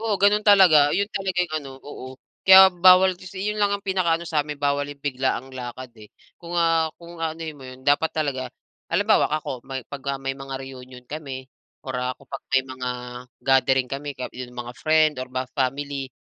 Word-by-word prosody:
Oo 220 Hz, -3 st, -1 dB
gano'n 205 Hz, +1 st, +4 dB
talaga 180 Hz, -8 st, +6 dB
'yon 200 Hz, +6 st, +1 dB
talaga 190 Hz, -2 st, -2 dB
yung 175 Hz, -3 st, -2 dB
ano, 135 Hz, -, -9 dB
oo, 145 Hz, -2 st, -9 dB, 0.4 s
kaya 190 Hz, 0 st, +9 dB
bawal 185 Hz, +1 st, +6 dB
'yon 190 Hz, +3 st, -5 dB
lang 205 Hz, -1 st, +2 dB
ang 200 Hz, 0 st, -3 dB
pinaka-ano 170 Hz, -3 st, 0 dB
sa'min 150 Hz, -2 st, -2 dB
bawal 145 Hz, 0 st, 0 dB
yung 145 Hz, -, -11 dB
biglaang 130 Hz, -1 st, -2 dB
lakad 125 Hz, 0 st, -7 dB
eh. 105 Hz, -1 st, -14 dB, 0.3 s
Kung 175 Hz, 0 st, -5 dB
ah, 165 Hz, -1 st, +2 dB
kung 170 Hz, -1 st, -11 dB
anuhin 160 Hz, -1 st, -4 dB
mo 135 Hz, -, -14 dB
'yon 130 Hz, 0 st, -11 dB
dapat 145 Hz, +3 st, +3 dB
talaga 135 Hz, -5 st, -2 dB, 0.4 s
halimbawa -, -, +3 dB
ako 130 Hz, -5 st, -4 dB
may 135 Hz, -1 st, -5 dB
pagka 140 Hz, -1 st, -4 dB
may 135 Hz, 0 st, -2 dB
mga 135 Hz, 0 st, -7 dB
reunion 130 Hz, -1 st, -11 dB
kami 135 Hz, -3 st, -7 dB, 0.4 s
or 130 Hz, -, -4 dB
ah 125 Hz, 0 st, -1 dB
kung 140 Hz, -, -20 dB
'pag 135 Hz, -1 st, -7 dB
may 130 Hz, -1 st, +4 dB
mga 130 Hz, -1 st, -5 dB, 0.5 s
gathering 135 Hz, -1 st, +3 dB
kami 140 Hz, +1 st, -4 dB
ka 125 Hz, -, -4 dB
'yong 125 Hz, -1 st, -8 dB
mga 120 Hz, 0 st, -6 dB
friend 155 Hz, -1 st, +3 dB
or -, -, -8 dB
ba 130 Hz, 0 st, -2 dB
family, 135 Hz, 0 st, -2 dB
145 Hz, 190 wpm, -23 LUFS, 130-170 Hz, 0.5 s, kaya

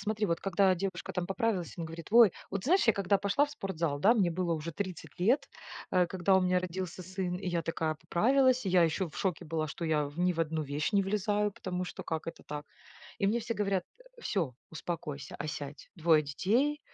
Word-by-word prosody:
Смотри, 210 Hz, +1 st, -1 dB
вот 170 Hz, -2 st, 0 dB
когда 195 Hz, 0 st, +3 dB
девушка 185 Hz, -1 st, -4 dB
там 180 Hz, -1 st, -2 dB
поправилась, 195 Hz, -, -1 dB
он 170 Hz, -, -2 dB
говорит: 165 Hz, +1 st, -8 dB
"Ой", 230 Hz, -4 st, +8 dB, 0.2 s
вот 195 Hz, -1 st, -3 dB
знаешь, 360 Hz, 0 st, +4 dB
я 225 Hz, -, +6 dB
когда 200 Hz, 0 st, +2 dB
пошла 200 Hz, +9 st, +2 dB
в -, -, -12 dB
спортзал, 170 Hz, -, -2 dB
да 215 Hz, +9 st, +5 dB
мне 195 Hz, -7 st, +3 dB
было 175 Hz, 0 st, -1 dB
уже 160 Hz, +1 st, -5 dB
30 180 Hz, -4 st, -6 dB
лет, 230 Hz, +11 st, +2 dB, 0.4 s
э, 180 Hz, -1 st, +3 dB
когда 190 Hz, +1 st, +2 dB
у -, -, +4 dB
меня 180 Hz, 0 st, +3 dB
родился 185 Hz, 0 st, -4 dB
сын, 185 Hz, 0 st, -3 dB
и 185 Hz, -1 st, -4 dB
я 170 Hz, -1 st, 0 dB
такая 160 Hz, -1 st, -1 dB
поправилась. 255 Hz, +9 st, +3 dB
Я 180 Hz, -2 st, +5 dB
ещё 165 Hz, +2 st, +1 dB
в -, -, -13 dB
шоке 185 Hz, -5 st, -1 dB
была, 155 Hz, 0 st, -2 dB
что 165 Hz, +2 st, -5 dB
я 155 Hz, -2 st, +2 dB
в 145 Hz, +3 st, -11 dB
ни 180 Hz, 0 st, +3 dB
в 165 Hz, -, -2 dB
одну 160 Hz, -1 st, 0 dB
вещь 145 Hz, +6 st, -2 dB
не 200 Hz, -1 st, +4 dB
влезаю, 210 Hz, +1 st, 0 dB
потому 180 Hz, -1 st, -4 dB
что -, -, -7 dB
как 160 Hz, -1 st, -4 dB
это 165 Hz, -, -7 dB
так? 150 Hz, 0 st, -6 dB, 0.5 s
И 200 Hz, -, +2 dB
мне 225 Hz, +4 st, +2 dB
все 230 Hz, +1 st, -3 dB
говорят: 195 Hz, -3 st, 0 dB, 0.4 s
"Всё, 170 Hz, -, -1 dB, 0.2 s
успокойся, 155 Hz, -3 st, -5 dB
осядь, 150 Hz, -1 st, -6 dB
2 160 Hz, -2 st, +4 dB
детей, 235 Hz, -, +1 dB
180 Hz, 215 wpm, -31 LUFS, 165-200 Hz, 0.5 s, Ой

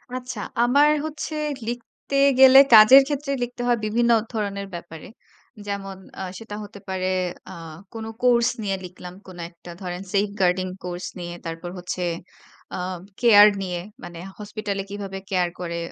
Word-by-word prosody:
আচ্ছা, 250 Hz, -3 st, -6 dB, 0.2 s
আমার 285 Hz, +5 st, +5 dB, 0.2 s
হচ্ছে 310 Hz, 0 st, -5 dB, 0.3 s
লিখতে 245 Hz, +3 st, -6 dB, 0.2 s
গেলে 265 Hz, 0 st, +9 dB, 0.2 s
কাজের 220 Hz, +5 st, +10 dB
ক্ষেত্রে 290 Hz, -1 st, -3 dB
লিখতে 245 Hz, 0 st, -6 dB
হয় 240 Hz, -1 st, +3 dB
বিভিন্ন 235 Hz, +2 st, +2 dB, 0.2 s
ধরনের 200 Hz, -2 st, -3 dB
ব্যাপারে। 170 Hz, -2 st, -9 dB, 0.6 s
যেমন 195 Hz, -1 st, -5 dB, 0.2 s
আ -, -, -4 dB, 0.2 s
সেটা 225 Hz, -2 st, -8 dB
হতে 205 Hz, 0 st, -11 dB
পারে 185 Hz, -1 st, -2 dB, 0.4 s
আ -, -, -8 dB, 0.4 s
কোন 225 Hz, -1 st, -6 dB, 0.2 s
কোর্স 240 Hz, -1 st, +4 dB
নিয়ে 195 Hz, -2 st, -1 dB
লিখলাম, 180 Hz, 0 st, -10 dB
কোন 185 Hz, -, -11 dB
একটা 170 Hz, 0 st, -13 dB
ধরেন 180 Hz, 0 st, -5 dB
safe 200 Hz, 0 st, +1 dB
guarding 185 Hz, 0 st, +1 dB
কোর্স 180 Hz, 0 st, -5 dB
নিয়ে, 175 Hz, 0 st, -6 dB
তারপর 165 Hz, +1 st, -6 dB
হচ্ছে 180 Hz, 0 st, -5 dB, 0.7 s
আ -, -, -4 dB, 0.4 s
কেয়ার 210 Hz, -4 st, +8 dB
নিয়ে, 180 Hz, -2 st, -3 dB, 0.2 s
মানে 170 Hz, -1 st, -9 dB, 0.2 s
হসপিটালে 210 Hz, -1 st, -4 dB
কিভাবে 200 Hz, -1 st, -6 dB
কেয়ার 180 Hz, -3 st, +1 dB
করে, 170 Hz, -1 st, -4 dB
200 Hz, 145 wpm, -23 LUFS, 180-235 Hz, 0.7 s, কাজের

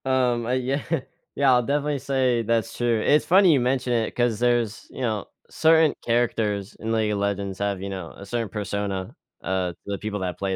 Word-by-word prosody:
Um, 125 Hz, -3 st, +1 dB
uh 120 Hz, -, -2 dB
yeah. 130 Hz, +2 st, -1 dB, 0.5 s
Yeah, 140 Hz, -2 st, +4 dB
I'll 125 Hz, 0 st, +4 dB
definitely 145 Hz, +2 st, 0 dB
say 130 Hz, -3 st, +1 dB
that's 115 Hz, 0 st, -1 dB
true. 120 Hz, -2 st, +1 dB
It's 150 Hz, +6 st, +3 dB
funny 185 Hz, -1 st, +6 dB
you 140 Hz, -, +3 dB
mention 125 Hz, 0 st, 0 dB
it 115 Hz, -2 st, -1 dB
'cause 120 Hz, -3 st, +1 dB
there's 120 Hz, -3 st, 0 dB
you -, -, -9 dB
know, 110 Hz, -5 st, -1 dB, 0.2 s
certain 160 Hz, -1 st, +4 dB
characters 110 Hz, -4 st, 0 dB
in 110 Hz, -, -4 dB
League 110 Hz, -1 st, +1 dB
of 105 Hz, -, -1 dB
Legends 100 Hz, -1 st, -2 dB
have, 100 Hz, -2 st, -1 dB
you 100 Hz, -, -4 dB
know, 95 Hz, -4 st, -6 dB
a 100 Hz, -, -10 dB
certain 115 Hz, +1 st, -3 dB
persona, 100 Hz, -2 st, -3 dB, 0.3 s
uh, 95 Hz, -1 st, -1 dB
to -, -, -15 dB
the 100 Hz, 0 st, -3 dB
people 105 Hz, -1 st, -4 dB
that 90 Hz, -1 st, -3 dB
play 95 Hz, -1 st, -1 dB
115 Hz, 205 wpm, -24 LUFS, 100-130 Hz, 0.5 s, funny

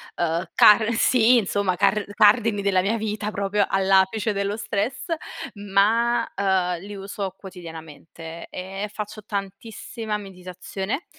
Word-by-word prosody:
ehm, 170 Hz, +1 st, -1 dB
car 220 Hz, +2 st, +6 dB
sì 240 Hz, +1 st, +4 dB
insomma, 200 Hz, -3 st, 0 dB
car 205 Hz, +3 st, +2 dB
cardini 210 Hz, 0 st, +4 dB
della 195 Hz, -2 st, +2 dB
mia 210 Hz, +5 st, 0 dB
vita, 210 Hz, -1 st, -3 dB
proprio, 200 Hz, 0 st, 0 dB
all'apice 195 Hz, +3 st, +2 dB
dello 200 Hz, +1 st, -2 dB
stress, 220 Hz, +3 st, -2 dB, 0.5 s
ma, 210 Hz, +4 st, +2 dB
ehm, 185 Hz, -3 st, +1 dB
li 205 Hz, +2 st, -8 dB
uso 195 Hz, -1 st, -5 dB
quotidianamente, 165 Hz, -2 st, -10 dB
e 195 Hz, +3 st, -5 dB
faccio 210 Hz, 0 st, -6 dB
tantissima 210 Hz, +2 st, -5 dB
meditazione, 195 Hz, -, -6 dB
200 Hz, 120 wpm, -23 LUFS, 190-215 Hz, 0.5 s, car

